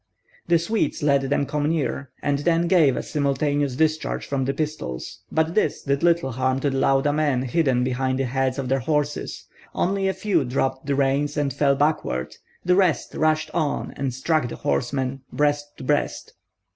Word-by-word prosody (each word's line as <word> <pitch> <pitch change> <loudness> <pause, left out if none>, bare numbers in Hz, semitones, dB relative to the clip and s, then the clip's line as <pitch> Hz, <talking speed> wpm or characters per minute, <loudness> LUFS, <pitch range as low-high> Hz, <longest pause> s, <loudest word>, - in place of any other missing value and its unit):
The 170 - +5
Swedes 170 -1 -1
let 140 -2 +2
them 140 0 +1
come 150 +1 -1
near, 140 -4 -2
and 140 -1 +1
then 170 +2 +2
gave 165 -8 +4
a - - -2
simultaneous 145 -1 0
discharge 155 +2 0
from 135 -2 -1
their 135 - 0
pistols; 150 - -4
but 160 +1 +1
this 215 - 0
did 140 0 0
little 170 -5 +2
harm 130 +2 0
to 145 - +1
the 135 - -1
Lauda 135 +2 +3
men 145 -4 +1
hidden 130 -2 +1
behind 130 +1 0
the 135 - 0
heads 130 +1 0
of 135 -2 -3
their 135 +1 +1
horses; 150 +2 -2 0.3
only 195 +1 +1
a 190 - +1
few 190 -8 +1
dropped 130 +1 -2
the 140 - +1
reins 140 +1 +1
and 140 -3 0
fell 140 0 +2
backward, 145 - -1 0.3
the 180 0 +4
rest 185 -5 +2
rushed 155 0 +1
on 155 -3 -1
and 135 -1 -2
struck 130 +2 0
the - - -6
horsemen, 130 - -1
breast 145 0 0
to - - -9
breast. 145 +3 -1
145 Hz, 185 wpm, -23 LUFS, 135-155 Hz, 0.3 s, The